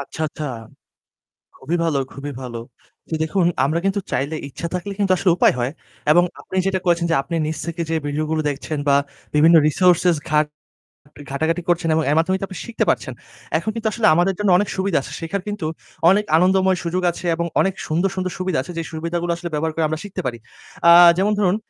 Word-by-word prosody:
আচ্ছা, 140 Hz, +3 st, -8 dB
আচ্ছা। 150 Hz, -, -7 dB, 1.1 s
খুবই 165 Hz, +6 st, -2 dB
ভালো 150 Hz, -4 st, +1 dB
খুবই 145 Hz, +1 st, -6 dB
ভালো। 120 Hz, -2 st, -6 dB, 0.5 s
তো -, -, -13 dB
দেখুন 170 Hz, +3 st, +1 dB, 0.2 s
আমরা 155 Hz, +4 st, 0 dB
কিন্তু 195 Hz, +1 st, +1 dB
চাইলে 140 Hz, +5 st, -1 dB
ইচ্ছা 170 Hz, +5 st, -6 dB
থাকলে 180 Hz, +3 st, -3 dB
কিন্তু 195 Hz, -2 st, +2 dB
আসলে 185 Hz, -1 st, +2 dB
উপায় -, -, +4 dB
হয়। 120 Hz, +2 st, 0 dB, 0.4 s
এবং 175 Hz, +3 st, +6 dB, 0.2 s
আপনি 190 Hz, -, -7 dB
যেটা 190 Hz, -1 st, 0 dB
করেছেন 170 Hz, -1 st, +2 dB
যে -, -, +3 dB
আপনি 140 Hz, +5 st, -6 dB
নিজ 155 Hz, 0 st, -3 dB
থেকে 170 Hz, 0 st, -3 dB
যে -, -, +1 dB
ভিডিও 150 Hz, +2 st, -1 dB
গুলো 160 Hz, -1 st, 0 dB
দেখছেন 145 Hz, +2 st, -4 dB
বা 140 Hz, -, +5 dB, 0.4 s
বিভিন্ন 165 Hz, +3 st, +6 dB
রিসোর্সেস 180 Hz, +1 st, +3 dB
ঘাট 150 Hz, 0 st, +3 dB, 0.8 s
ঘাটাঘাটি 160 Hz, +5 st, -1 dB
করছেন 170 Hz, -1 st, +1 dB
এবং 160 Hz, -, +2 dB
এর -, -, +3 dB
মাধ্যমেই 185 Hz, +3 st, +1 dB
টয় 195 Hz, -, -4 dB
আপনি 190 Hz, -, -9 dB
শিখতে 235 Hz, -1 st, -1 dB
পারছেন। -, -, -1 dB, 0.5 s
এখন 220 Hz, -, -3 dB
কিন্তু 225 Hz, -1 st, -1 dB
আসলে 230 Hz, -, +1 dB
আমাদের 180 Hz, +3 st, +2 dB
জন্য 205 Hz, -2 st, +1 dB
অনেক 205 Hz, -, 0 dB
সুবিধা 190 Hz, -4 st, +1 dB
আছে। -, -, -9 dB
শেখার 175 Hz, +4 st, -3 dB
কিন্তু 205 Hz, -6 st, -3 dB, 0.4 s
অনেক 210 Hz, +2 st, +3 dB
আনন্দময় 185 Hz, +1 st, +3 dB
সুযোগ 180 Hz, +2 st, -1 dB
আছে 170 Hz, -, -9 dB
এবং 170 Hz, 0 st, -1 dB
অনেক 195 Hz, -1 st, +1 dB
সুন্দর, 170 Hz, +5 st, +1 dB
সুন্দর 185 Hz, -1 st, -2 dB
সুবিধা 185 Hz, -5 st, -1 dB
আছে 175 Hz, -, -9 dB
যে 165 Hz, -, -1 dB
সুবিধাগুলো 170 Hz, +2 st, -2 dB, 0.2 s
ব্যবহার 160 Hz, +1 st, -1 dB
করে 165 Hz, -, 0 dB
আমরা 155 Hz, 0 st, -2 dB
শিখতে 200 Hz, -, -6 dB
পারি। 120 Hz, -2 st, -3 dB, 0.5 s
আ -, -, +10 dB, 0.3 s
যেমন 205 Hz, +2 st, +2 dB
ধরুন 195 Hz, -1 st, +2 dB
170 Hz, 200 wpm, -21 LUFS, 155-190 Hz, 1.1 s, আ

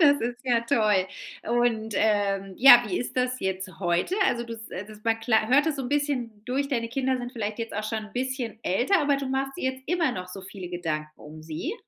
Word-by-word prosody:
Das 285 Hz, -3 st, +6 dB
ist 240 Hz, +1 st, -3 dB
ja 240 Hz, -2 st, +3 dB
toll. 215 Hz, -6 st, +2 dB, 0.4 s
Und, 230 Hz, -2 st, 0 dB
ähm, 200 Hz, -2 st, +1 dB
ja, 245 Hz, -2 st, +9 dB
wie 185 Hz, -3 st, -1 dB
ist 245 Hz, -, -5 dB
das 255 Hz, 0 st, 0 dB
jetzt 190 Hz, 0 st, -3 dB
heute? 175 Hz, -, 0 dB
Also, 235 Hz, 0 st, 0 dB
du 230 Hz, -1 st, -6 dB
s 225 Hz, 0 st, -10 dB
das 210 Hz, +3 st, -8 dB
man 225 Hz, 0 st, +1 dB
kla 220 Hz, -1 st, +2 dB
hört 280 Hz, +5 st, +5 dB
das 315 Hz, -3 st, 0 dB
so 270 Hz, -, -3 dB
'n 245 Hz, -, -4 dB
bisschen 255 Hz, -7 st, -1 dB
durch. 270 Hz, +3 st, -1 dB
Deine 235 Hz, -5 st, -1 dB
Kinder 260 Hz, +1 st, 0 dB
sind 245 Hz, 0 st, -6 dB
vielleicht 215 Hz, -2 st, -4 dB
jetzt 230 Hz, -1 st, -4 dB
auch 210 Hz, +1 st, -2 dB
schon 215 Hz, 0 st, -3 dB
'n 210 Hz, -, -18 dB
bisschen 255 Hz, -2 st, -3 dB
älter, 250 Hz, -, +2 dB
aber 285 Hz, -1 st, +2 dB
du 275 Hz, 0 st, -3 dB
machst 270 Hz, +1 st, -2 dB
dir 260 Hz, -7 st, -1 dB
jetzt 260 Hz, 0 st, -13 dB
immer 335 Hz, -4 st, +1 dB
noch 180 Hz, -3 st, -6 dB
so 190 Hz, +2 st, -8 dB
viele 190 Hz, -1 st, -8 dB
Gedanken 160 Hz, -4 st, -3 dB
um 155 Hz, +1 st, -11 dB
sie? 160 Hz, -, -4 dB
230 Hz, 230 wpm, -26 LUFS, 205-260 Hz, 0.4 s, ja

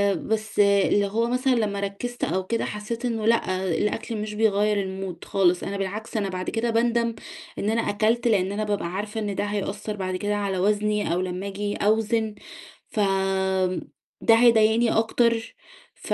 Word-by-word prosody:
بس 220 Hz, -1 st, -3 dB
اللي 200 Hz, 0 st, +4 dB
هو 225 Hz, +4 st, 0 dB
مثلًا 255 Hz, +2 st, +1 dB
لمّا 210 Hz, -3 st, 0 dB
ركزت 200 Hz, +5 st, -4 dB
أو 190 Hz, 0 st, 0 dB
كده 230 Hz, +4 st, -1 dB
حسيت 220 Hz, +3 st, -5 dB
إنه 225 Hz, -3 st, -1 dB
لأ 190 Hz, -5 st, +1 dB
الأكل 225 Hz, +2 st, -2 dB
مش 210 Hz, 0 st, -4 dB
بيغيّر 210 Hz, -1 st, +2 dB
الmood 190 Hz, -2 st, -6 dB
خالص، 180 Hz, -2 st, +2 dB
أنا 200 Hz, 0 st, -3 dB
بالعكس 210 Hz, +4 st, -4 dB
أنا 200 Hz, -2 st, -1 dB
بعد 185 Hz, 0 st, -3 dB
كده 235 Hz, +1 st, -1 dB
باندم 235 Hz, 0 st, +1 dB, 0.4 s
إن 205 Hz, -, 0 dB
أنا 230 Hz, +1 st, +1 dB
أكلت، 225 Hz, +3 st, +1 dB
لأن 195 Hz, -4 st, +2 dB
أنا 210 Hz, +1 st, -2 dB
بابقى 205 Hz, -4 st, -1 dB
عارفة 205 Hz, +5 st, -4 dB
إن 205 Hz, -2 st, -3 dB
ده -, -, -1 dB
هيأثر 205 Hz, +1 st, -3 dB
بعد 185 Hz, -2 st, -3 dB
كده 205 Hz, +3 st, -1 dB
على 200 Hz, -2 st, -1 dB
وزني 210 Hz, 0 st, +1 dB
أو 180 Hz, -, 0 dB
لمّا 185 Hz, +1 st, -4 dB
آجي 205 Hz, +1 st, -3 dB
أوزن، 220 Hz, +1 st, +1 dB, 0.5 s
ف -, -, -5 dB, 1.2 s
ده 225 Hz, -, +6 dB
هيضايقني 230 Hz, 0 st, +4 dB
أكتر 225 Hz, 0 st, +1 dB, 0.4 s
ف -, -, -4 dB
210 Hz, 165 wpm, -25 LUFS, 200-225 Hz, 1.2 s, ده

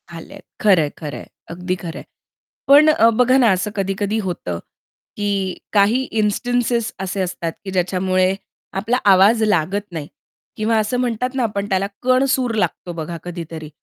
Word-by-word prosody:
आलेत, 165 Hz, -1 st, -11 dB, 0.2 s
खरंय, 180 Hz, -8 st, +4 dB
खरंय, 150 Hz, -2 st, -7 dB, 0.2 s
अगदी 180 Hz, +2 st, -3 dB
खरं 170 Hz, -2 st, -6 dB
आहे. -, -, -12 dB, 0.6 s
पण 290 Hz, +2 st, +7 dB
अ, 230 Hz, -7 st, +5 dB
बघा 250 Hz, +3 st, +3 dB
ना, 245 Hz, -4 st, +5 dB
असं 190 Hz, +3 st, -1 dB
कधी-कधी 195 Hz, +2 st, -1 dB
होतं 90 Hz, -, -4 dB, 0.6 s
की 200 Hz, -2 st, -1 dB, 0.2 s
काही 210 Hz, +5 st, +4 dB, 0.2 s
इन्स्टिंटेस 235 Hz, +2 st, 0 dB
असे 190 Hz, +1 st, -3 dB
असतात 175 Hz, -2 st, -3 dB
की 190 Hz, -, -4 dB
ज्याच्यामुळे 185 Hz, 0 st, +1 dB, 0.5 s
आपला 230 Hz, +5 st, 0 dB
आवाज 205 Hz, +4 st, +5 dB
लागत 195 Hz, -1 st, +1 dB
नाही 155 Hz, -4 st, -5 dB, 0.5 s
किंवा 220 Hz, +1 st, +1 dB
असं 215 Hz, +4 st, -1 dB
म्हणतात 250 Hz, 0 st, -1 dB
ना, 260 Hz, -, +1 dB
आपण 205 Hz, -3 st, -2 dB
त्याला 190 Hz, +1 st, +1 dB, 0.2 s
कणसूर 255 Hz, -1 st, +2 dB
लागतो 180 Hz, -4 st, -2 dB
बघा 165 Hz, +1 st, -5 dB
कधीतरी, 165 Hz, -3 st, -7 dB
200 Hz, 150 wpm, -20 LUFS, 180-230 Hz, 0.6 s, पण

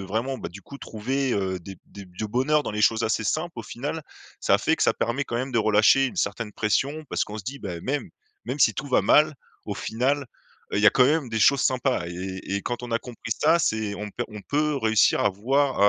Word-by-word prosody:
vraiment, 115 Hz, +8 st, -2 dB
bah, -, -, -6 dB
du 100 Hz, +4 st, -11 dB
coup, 140 Hz, -, -11 dB
trouver, 130 Hz, +3 st, -2 dB
heu, 95 Hz, -2 st, -1 dB
des 95 Hz, +2 st, -10 dB
des 100 Hz, -1 st, -11 dB
du 90 Hz, +4 st, -6 dB
bonheur 135 Hz, +7 st, +2 dB
dans -, -, -4 dB
les 105 Hz, 0 st, -2 dB
choses 115 Hz, +1 st, +3 dB
assez 110 Hz, 0 st, 0 dB
simples, 155 Hz, -, -2 dB
au -, -, -4 dB
final, 145 Hz, +8 st, -5 dB, 0.4 s
ça -, -, +3 dB
fait -, -, +1 dB
que -, -, -1 dB
ça -, -, +4 dB
permet, 135 Hz, +5 st, -1 dB
quand 120 Hz, -, -4 dB
même, 130 Hz, +2 st, -2 dB
de 115 Hz, -, +1 dB
relâcher 110 Hz, +5 st, +5 dB
une -, -, -7 dB
certaine 110 Hz, -3 st, -2 dB
pression 135 Hz, -, 0 dB
parce -, -, 0 dB
qu'on 105 Hz, +1 st, -7 dB
se 100 Hz, -, -9 dB
dit: 140 Hz, +5 st, -5 dB
«Bah, 90 Hz, -6 st, -6 dB
même 140 Hz, +6 st, -3 dB, 0.3 s
même 145 Hz, -, -4 dB
si 110 Hz, -, +5 dB
tout 145 Hz, -, -4 dB
va 130 Hz, -, +3 dB
mal, 155 Hz, +1 st, +5 dB, 0.3 s
au -, -, -4 dB
final, 135 Hz, +4 st, -1 dB, 0.5 s
heu, -, -, 0 dB
il -, -, +2 dB
y -, -, +6 dB
a -, -, +9 dB
quand 125 Hz, -1 st, +5 dB
même 145 Hz, -4 st, +1 dB
des 110 Hz, -, -1 dB
choses 140 Hz, +3 st, +5 dB
sympas». 125 Hz, -7 st, +1 dB
Et 85 Hz, -, -6 dB
et 95 Hz, +2 st, -4 dB
et -, -, -2 dB
quand 120 Hz, 0 st, -4 dB
on 120 Hz, -, -6 dB
a 115 Hz, -, +1 dB
compris 120 Hz, -2 st, -5 dB
ça, 160 Hz, +3 st, +5 dB
c'est 110 Hz, -8 st, 0 dB
on 105 Hz, 0 st, -6 dB
p 120 Hz, -, -4 dB
on 105 Hz, -2 st, -9 dB
peut 150 Hz, 0 st, 0 dB
réussir 110 Hz, -3 st, +3 dB
à -, -, +3 dB
voi 135 Hz, +7 st, +1 dB
115 Hz, 255 wpm, -25 LUFS, 105-135 Hz, 0.5 s, a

